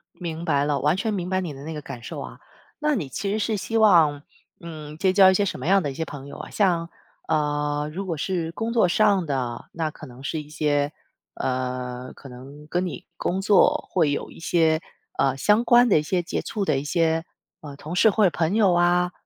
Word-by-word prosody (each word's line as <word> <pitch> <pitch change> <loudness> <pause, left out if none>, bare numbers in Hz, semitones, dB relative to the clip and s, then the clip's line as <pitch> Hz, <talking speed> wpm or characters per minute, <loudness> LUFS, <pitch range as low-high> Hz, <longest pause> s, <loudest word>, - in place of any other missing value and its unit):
明 165 -2 -5
白 145 -3 +2
了， 145 -1 0
完 150 +4 +2
全 215 +2 -1
明 180 -3 -3
白 185 0 0
你 170 -5 -5
的 135 - -10
那 160 +2 -6
个 150 - -6
感 135 -3 -8
受 - - -6
啊。 - - -9 0.4
那 300 -1 +1
你 155 - -3
其 195 +9 -3
实 215 - 0
是 215 0 0
希 225 +3 -2
望， 165 -9 +5 0.4
嗯， 155 -2 -9
结 185 +2 +2
交 190 -1 +7
一 - - +2
些 200 +2 +2
什 - - -4
么 - - -5
样 195 0 +4
的 145 - -2
一 - - -8
些 160 +3 -3
朋 140 -1 -9
友 - - -9
啊？ - - -8
像， 170 -5 +1 0.4
呃， 150 0 0
如 195 +2 -4
果 165 -3 -3
是 165 0 -2
工 225 +4 -3
作 225 -6 +4
上 200 -1 +3
的， 130 -5 -3
那 160 -2 -2
可 - - -11
能 125 +1 -13
是 155 +2 -3
一 150 - -14
些， 145 -1 0 0.4
呃， 125 0 -3
可 135 - -12
能 135 +4 -12
跟 180 +3 -1
你 180 - -6
工 190 +2 -1
作 205 0 +3
会 160 -5 +2
有 - - -3
一 - - -13
些， 165 -2 +2 0.4
呃， 135 -1 +2
相 210 +9 +3
关 240 0 +5
的 155 - +5
一 - - -1
些 175 +4 0
接 175 - -3
触 210 -3 -3
的 145 -4 +1
一 140 - -6
些， 165 +1 +1 0.4
呃， 145 -2 -9
同 155 +4 -7
事 215 +5 +5
或 215 +2 +2
者 190 - +6
朋 165 +4 -1
友 200 -5 +4
啊？ 175 +1 +3
165 Hz, 250 characters per minute, -24 LUFS, 145-190 Hz, 0.4 s, 交